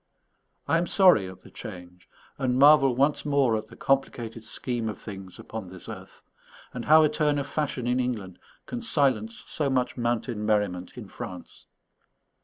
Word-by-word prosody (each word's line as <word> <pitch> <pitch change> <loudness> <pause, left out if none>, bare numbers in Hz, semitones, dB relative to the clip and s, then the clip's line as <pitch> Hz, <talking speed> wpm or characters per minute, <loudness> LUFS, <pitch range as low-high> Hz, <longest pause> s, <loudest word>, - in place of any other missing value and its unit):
I 165 - +3
am 175 - -1
sorry 180 - +5
at 95 - -12
the - - -16
change, 90 0 -10 0.3
and 125 -2 +1
marvel 135 -2 +6
once 140 +3 +2
more 140 -5 +2
at 110 0 -4
the - - -14
complicated 120 -4 -1
scheme 115 +1 -2
of 105 - -6
things 95 -3 -9
upon 110 -4 -7
this 90 0 -11
earth, - - -10 0.5
and 125 -2 -5
how 155 +1 +7
a - - +5
turn 150 -1 +1
of 140 - -1
fashion 140 -5 -2
in 125 +1 +1
England 110 -8 -3 0.3
can 245 -1 -5
silence 130 - 0
so 145 -3 -1
much 130 -1 0
mountain 120 -2 -1
merriment 105 -4 -1
in - - -8
France. - - -9
125 Hz, 170 wpm, -26 LUFS, 105-140 Hz, 0.5 s, how